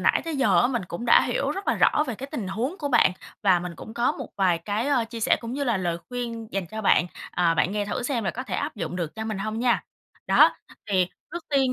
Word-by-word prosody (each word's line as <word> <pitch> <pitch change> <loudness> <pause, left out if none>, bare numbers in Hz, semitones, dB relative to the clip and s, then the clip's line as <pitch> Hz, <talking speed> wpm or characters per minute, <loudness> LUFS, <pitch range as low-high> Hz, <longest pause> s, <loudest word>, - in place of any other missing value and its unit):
nãy - - +3
tới 325 -3 -3
giờ 265 - +4
á, - - +4
mình 240 -7 -1
cũng 170 +7 -5
đã - - +7
hiểu - - -1
rất 390 - -5
là - - +3
rõ 300 - +3
về 245 - -2
cái 260 +6 -7
tình 225 -11 -3
huống 235 - -2
của 290 - -2
bạn 240 -8 +4 0.3
và 185 -3 +5
mình 180 0 -5
cũng 220 - -10
có 240 +1 +2
một - - -7
vài 185 -4 +3
cái, 205 +8 -2
ơ, 255 -5 +2
chia 230 -1 -6
sẻ - - +3
cũng 230 0 -6
như 280 +2 -2
là 235 -5 +1
lời 175 -2 -1
khuyên 235 -3 -5
dành 195 -2 -2
cho 220 0 -5
bạn, 180 -3 +4 0.2
à, 170 -2 +2
bạn 175 +4 +1
nghe 210 0 -1
thử 245 - -3
xem 245 -4 -1
là 190 - +1
có 255 - -5
thể - - -5
áp 290 -2 -2
dụng 175 -2 -4
được 170 -4 -3
cho 220 - -4
mình 215 -3 -3
hông 215 +3 -3
nha. 240 -1 +2 0.4
Đó, - - +6 0.3
thì 185 -2 +3 0.2
trước 345 -1 -5
tiên 270 -3 +3
225 Hz, 275 wpm, -25 LUFS, 190-255 Hz, 0.4 s, đã